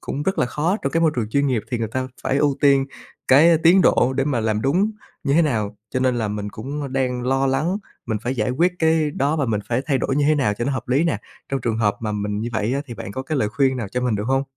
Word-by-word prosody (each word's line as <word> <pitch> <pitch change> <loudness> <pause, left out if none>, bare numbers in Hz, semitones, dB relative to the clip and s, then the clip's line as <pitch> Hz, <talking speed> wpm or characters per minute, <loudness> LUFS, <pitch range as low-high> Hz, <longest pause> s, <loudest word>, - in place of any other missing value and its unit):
cũng 145 - -4
rất 190 +6 -1
là - - +2
khó 155 - 0
trong 135 - -2
cái 165 - +2
môi 165 -1 +4
trường 115 -3 -1
chuyên 140 +4 +2
nghiệp 125 -6 0
thì 120 - -1
người 115 -1 -2
ta 130 +3 -3
phải 135 - 0
ưu 145 -2 +2
tiên 140 -1 +4 0.4
cái 160 +5 +6
tiến 170 +4 +5
độ 125 - +3
để 135 - +1
mà 135 -5 0
làm 110 -1 0
đúng 180 +11 +2 0.3
như 140 - +1
thế 170 - +5
nào. 110 -8 -1 0.2
Cho 130 - +1
nên 130 -1 +2
là 110 -2 -1
mình 105 0 -4
cũng, 140 +8 -6
ơ, 140 - -4
đang 130 -2 -1
lo 135 +2 +1
lắng 145 +8 0 0.3
mình 110 -2 -1
phải 125 +2 -2
giải 110 0 0
quyết 170 +8 +2
cái 160 -2 +2
đó 145 +2 0
và 145 -4 0
mình 110 -3 0
phải 120 +2 0
thay 135 -4 +1
đổi 135 - -1
như 145 - +2
thế 155 - +4
nào 125 -8 +1
cho 120 - -3
nó 140 - 0
hợp 130 - -5
lý 135 +6 +2
nè? 165 -10 0 0.3
Trong 135 -1 -2
trường 115 -1 -1
hợp 105 -3 +1
mà 110 -2 -2
mình 105 0 -2
như 115 - -2
vậy 110 +3 0
á 140 - -1
thì 120 - -7
bạn 100 -2 -7
có 130 - -4
cái 145 +2 -2
lời 105 -4 +1
khuyên 130 +3 +1
nào 115 -5 -4
cho 125 +5 -2
mình 125 -3 0
được 105 - -3
hông? 135 +1 +2
130 Hz, 300 wpm, -22 LUFS, 115-145 Hz, 0.4 s, cái